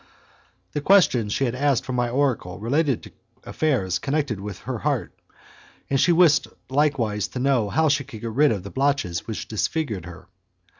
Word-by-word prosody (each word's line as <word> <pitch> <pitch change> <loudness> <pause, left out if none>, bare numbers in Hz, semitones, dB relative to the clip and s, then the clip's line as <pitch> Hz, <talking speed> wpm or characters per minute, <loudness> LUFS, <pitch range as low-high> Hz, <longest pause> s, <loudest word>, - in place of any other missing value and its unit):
The 150 - -3
questions 140 - +4
she 135 - +1
had 120 - -1
asked 135 -1 +1
from 130 - -4
my 120 -1 0
oracle 125 -9 -1
related 135 - 0
to - - -12 0.3
affairs 125 - 0
connected 140 -7 -1
with 100 -1 -7
her - - -4
heart, - - -1 0.8
and 135 - +2
she 175 - +4
wished 165 -2 +4 0.2
likewise 130 -8 +1
to 125 - -6
know 125 -5 +1
how 160 +11 +2
she 145 -1 +2
could 120 -5 -11
get 115 - -4
rid 145 +5 +4
of 100 -5 -2
the 100 - -8
blotches 135 -11 -1
which 110 - -5
disfigured 110 - -2
her. 90 +1 -12
130 Hz, 180 wpm, -23 LUFS, 105-145 Hz, 0.8 s, questions